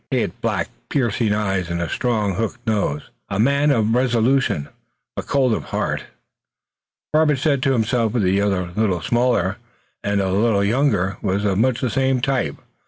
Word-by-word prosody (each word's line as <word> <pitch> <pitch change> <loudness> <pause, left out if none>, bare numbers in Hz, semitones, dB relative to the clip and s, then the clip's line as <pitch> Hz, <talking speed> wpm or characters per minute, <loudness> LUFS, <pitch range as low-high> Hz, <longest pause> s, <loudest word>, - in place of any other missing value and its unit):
He - - +1
had - - -4
black, - - -1 0.2
piercing 115 -4 0
eyes 95 -4 -1
and 85 0 -2
a 85 - -1
strong 110 -4 0
hooked 115 +4 -4
nose. 100 - -1 0.2
A 95 - -2
man 140 +5 +3
of 115 -5 +2
resolution 125 - +1 0.5
but - - -5
cold 130 -4 +2
of - - -3
heart, - - -2 1.1
Robert 155 -1 +4
said 140 -1 +1
to 135 0 +2
himself. 115 -1 +1
The 100 -4 +2
other, 100 -2 +1
a - - -3
little 95 -6 0
smaller, 120 0 +1 0.5
and 100 0 0
a 95 -1 0
little 100 +1 +2
younger, 105 -4 +1
was 100 0 -1
of 100 -1 +1
much 125 +1 +1
the 125 -4 0
same 130 +1 +1
type. 125 - -1
115 Hz, 170 wpm, -21 LUFS, 100-130 Hz, 1.1 s, Robert